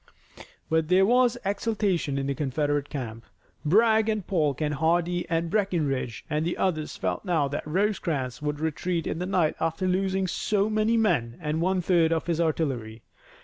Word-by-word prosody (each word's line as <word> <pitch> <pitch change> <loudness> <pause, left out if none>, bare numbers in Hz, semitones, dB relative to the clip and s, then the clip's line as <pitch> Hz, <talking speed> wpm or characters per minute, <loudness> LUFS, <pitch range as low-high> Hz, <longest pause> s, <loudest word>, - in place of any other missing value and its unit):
But 160 -1 +1
there 185 +3 +5
was 245 +2 +3
exultation 200 -7 0
in 135 - -1
the 140 - 0
Confederate 145 0 -1
camp. 115 -5 -6 0.4
Bragg 220 +6 +4
and 215 -4 -1
Polk 150 -8 0
and 150 -1 0
Hardee 170 +4 +1
and 165 0 -1
Breckinridge 155 - -1
and 150 +1 -1
the 175 +2 -2
others 155 -5 -1
felt 90 -1 -2
now 160 -6 +1
that 145 +2 -4
Rosecrans 160 - -1
would 150 0 -2
retreat 160 +2 -2
in 160 - -3
the 180 - -2
night 180 -5 +1
after 165 +3 -1
losing 190 +1 +1
so 205 +3 0
many 215 +2 +2
men 145 - +1
and 155 +1 -2
one 185 +1 +1
third 170 -2 +3
of 165 -1 0
his 170 -1 0
artillery. 130 -9 -2
165 Hz, 170 wpm, -26 LUFS, 150-190 Hz, 0.4 s, there